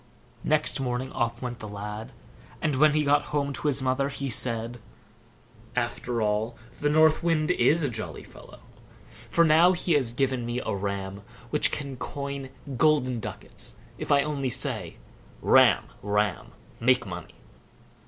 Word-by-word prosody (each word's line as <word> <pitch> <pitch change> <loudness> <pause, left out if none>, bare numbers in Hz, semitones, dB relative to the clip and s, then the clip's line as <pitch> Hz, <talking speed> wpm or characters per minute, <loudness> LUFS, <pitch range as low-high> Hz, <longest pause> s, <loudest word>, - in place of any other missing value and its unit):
Next 155 -1 +1
morning 130 0 -2
off 120 +1 -2
went 120 -2 -4
the 105 - -7
lad; 105 +2 -6 0.5
and 150 -3 0
when 150 +2 +5
he 155 - +3
got 145 +1 +3
home 140 -1 -1
to 150 - -3
his 140 -2 +1
mother, 130 +2 +1
he 140 -1 -4
said: 115 0 0 1.0
"After 120 -1 -1
all, 105 +3 0 0.2
the 145 - +1
North 155 +1 +5
Wind 165 -1 +2
is 165 -2 +3
a - - +2
jolly 115 -4 -6
fellow; - - -14 0.7
for 170 +5 +4
now 165 +3 +6
he 175 -1 0
has 130 -6 +2
given 130 0 0
me 120 +1 -2
a - - -3
ram 100 0 -4 0.3
which - - +4
can 140 -3 -4
coin 140 0 -5 0.3
golden 135 -5 +3
ducats - - -7 0.2
if - - -4
I 140 -1 +5
only 140 -3 -2
say - - -1 0.4
'Ram, - - +5 0.2
ram! 105 -2 -1 0.3
make 125 0 +3
money. 90 -4 -8
130 Hz, 155 wpm, -27 LUFS, 115-145 Hz, 1.0 s, now